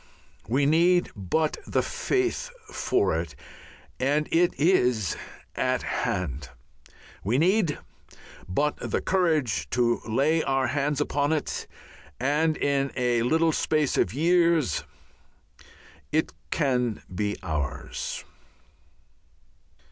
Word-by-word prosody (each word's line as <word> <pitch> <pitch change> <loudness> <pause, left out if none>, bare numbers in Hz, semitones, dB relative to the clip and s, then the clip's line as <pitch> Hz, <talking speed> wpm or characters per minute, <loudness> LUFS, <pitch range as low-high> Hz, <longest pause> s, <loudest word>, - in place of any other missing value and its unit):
We 135 +5 +2
need 175 +4 +3
but 115 - 0
the - - +1
faith 385 +6 -1 0.2
for 385 +1 +1
it, - - -9 0.6
and 145 +3 +1
it 170 +1 +4
is 125 - +3 0.4
at - - 0
hand; 75 -6 -2 0.7
we 115 +6 +1
need 175 0 +2 0.7
but 145 +11 0
the - - -2
courage 150 - +1
to 120 -1 +1
lay 145 +8 +2
our 135 -2 +1
hands 145 +1 0
upon 145 0 0
it 155 -2 -2 0.5
and 150 +4 +1
in 140 -1 +1
a 120 -2 +1
little 160 +7 +3
space 155 -2 +1
of - - +2
years 165 - +2 1.3
it 155 +1 +1 0.2
can 125 -7 0
be 105 +2 -1
ours. 75 -3 -4
145 Hz, 100 wpm, -26 LUFS, 120-160 Hz, 1.3 s, it